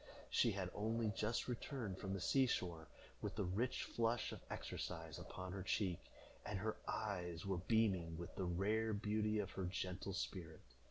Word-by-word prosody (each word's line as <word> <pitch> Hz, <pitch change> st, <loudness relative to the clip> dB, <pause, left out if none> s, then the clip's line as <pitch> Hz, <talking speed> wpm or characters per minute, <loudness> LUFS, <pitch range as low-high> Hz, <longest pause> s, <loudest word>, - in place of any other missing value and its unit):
She -, -, +5 dB
had -, -, -1 dB
only 110 Hz, +1 st, +1 dB
just 105 Hz, +3 st, 0 dB
returned 120 Hz, -5 st, -2 dB
from 95 Hz, -1 st, -2 dB
the 100 Hz, -, -1 dB
sea 130 Hz, +8 st, +5 dB
shore, 85 Hz, -8 st, -1 dB, 0.3 s
with -, -, -2 dB
the 105 Hz, -, +1 dB
rich 100 Hz, +7 st, +1 dB
flush 115 Hz, 0 st, +1 dB
of -, -, -5 dB
exercise -, -, -3 dB
upon 95 Hz, 0 st, -5 dB
her 95 Hz, +1 st, -3 dB
cheek, 95 Hz, -2 st, +1 dB, 0.4 s
and 105 Hz, -, -2 dB
her 110 Hz, +3 st, 0 dB
eyes 90 Hz, -6 st, -1 dB
were 95 Hz, -2 st, +1 dB
beaming 95 Hz, -6 st, +3 dB
with 85 Hz, 0 st, -5 dB
the 95 Hz, -, 0 dB
rare 105 Hz, +5 st, +2 dB
beauty 105 Hz, +1 st, +2 dB
of 100 Hz, -3 st, 0 dB
her 95 Hz, -, -2 dB
gentle 95 Hz, +1 st, -2 dB
spirit. 85 Hz, -4 st, -3 dB
100 Hz, 170 wpm, -42 LUFS, 90-110 Hz, 0.4 s, She